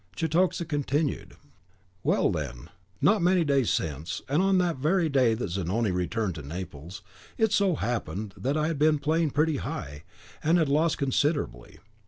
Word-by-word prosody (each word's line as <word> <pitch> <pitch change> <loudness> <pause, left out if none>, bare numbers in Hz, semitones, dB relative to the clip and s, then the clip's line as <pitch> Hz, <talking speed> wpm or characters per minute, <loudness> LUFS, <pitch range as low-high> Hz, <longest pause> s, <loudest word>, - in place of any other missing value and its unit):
Cetoxa 170 - +1
continued. 145 -1 -2 0.7
"Well, - - +2
then, 70 -1 -5 0.3
not 210 -1 +4
many 180 0 +3
days 140 -5 +2
since, 75 +1 -2
and 145 +5 +2
on 195 0 +3
the 175 -2 +2
very 160 +5 +1
day 130 -5 +3
that 110 -6 -4
Zanoni 100 +4 0
returned 90 +3 -1
to 80 - -7
Naples, 85 +3 -8 0.3
it 220 -2 +2
so 200 -4 +3
happened 110 -4 -3
that 140 +7 -1
I 155 - +1
had 155 -2 -2
been 155 0 +4
playing 155 +2 +1
pretty 150 +1 +1
high, 75 - -6 0.4
and 165 +3 +4
had 160 -4 +2
lost 155 +3 +2
considerably. 140 - -1
140 Hz, 160 wpm, -27 LUFS, -, 0.7 s, not